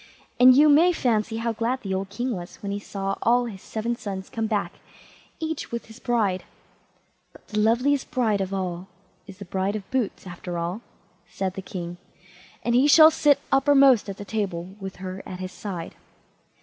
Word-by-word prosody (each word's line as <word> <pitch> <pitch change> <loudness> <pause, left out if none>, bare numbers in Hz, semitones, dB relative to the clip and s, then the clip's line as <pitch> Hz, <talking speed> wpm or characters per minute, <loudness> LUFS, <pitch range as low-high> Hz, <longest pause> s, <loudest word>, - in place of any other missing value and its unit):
And 255 +1 +8
you 300 +2 +7
may 315 +5 +6
fancy 225 -7 0
how 230 0 -1
glad 235 +4 -1
the 195 -2 -3
old 190 0 -2
king 245 +4 -3
was 175 -1 -8
when 200 - -3
he 200 - -2
saw 195 -1 -4
all 245 +1 +3
his 200 -5 -8
seven 230 +2 -3
sons 195 -4 -6
come 225 -1 -2
back, 210 -2 -2 0.6
each 320 -2 -4
with 235 0 -4
his 220 +2 -14
bride—"But 215 -7 -5
the 210 - -1
loveliest 250 +6 +2
bride 230 -8 +1
of 190 0 -3
all 185 -2 -3 0.4
is 195 -2 -11
the 200 - -9
bride 190 +3 -1
of 205 -3 -6
Boots, 255 -7 -2
after 175 -1 -6
all", 175 +6 -3 0.5
said 190 -2 -3
the 195 - -6
king, 175 -2 -6 0.7
"and 235 - 0
he 255 +4 +5
shall 315 +2 +8
sit 295 -2 +3
uppermost 270 -5 +5
at 195 - -6
the 205 - -8
table, 195 -4 -3
with 190 -1 -7
her 185 +1 -6
by - - -8
his 185 0 -6
side." 180 -6 -6
210 Hz, 185 wpm, -25 LUFS, 190-245 Hz, 0.7 s, And